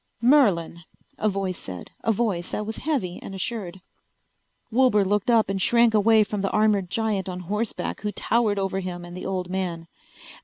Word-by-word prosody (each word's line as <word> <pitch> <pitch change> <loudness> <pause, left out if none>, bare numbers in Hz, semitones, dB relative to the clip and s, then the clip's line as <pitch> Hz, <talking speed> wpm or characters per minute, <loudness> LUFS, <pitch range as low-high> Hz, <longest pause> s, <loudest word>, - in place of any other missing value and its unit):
"Merlin," 220 - +3 0.4
a 215 - +2
voice 195 -2 -3
said, 90 -2 -8
a 225 - +2
voice 200 -6 -1
that 210 - -3
was 220 +1 -5
heavy 255 - -2
and 195 - -8
assured. 190 -2 -4 0.9
Wilbur 230 -4 +4
looked 205 +3 0
up 230 -2 +4
and 195 0 -2
shrank 235 +2 +4
away 220 +1 +5
from 205 -1 -3
the 195 - 0
armored 210 -4 +2
giant 210 -4 -1
on 180 0 -5
horseback 210 +5 -3
who 210 - -2
towered 220 -1 +1
over 195 -1 -1
him 180 -2 -5
and 175 0 -10
the 185 - -5
old 185 -2 -2
man. 180 -3 -3
200 Hz, 180 wpm, -24 LUFS, 185-220 Hz, 0.9 s, away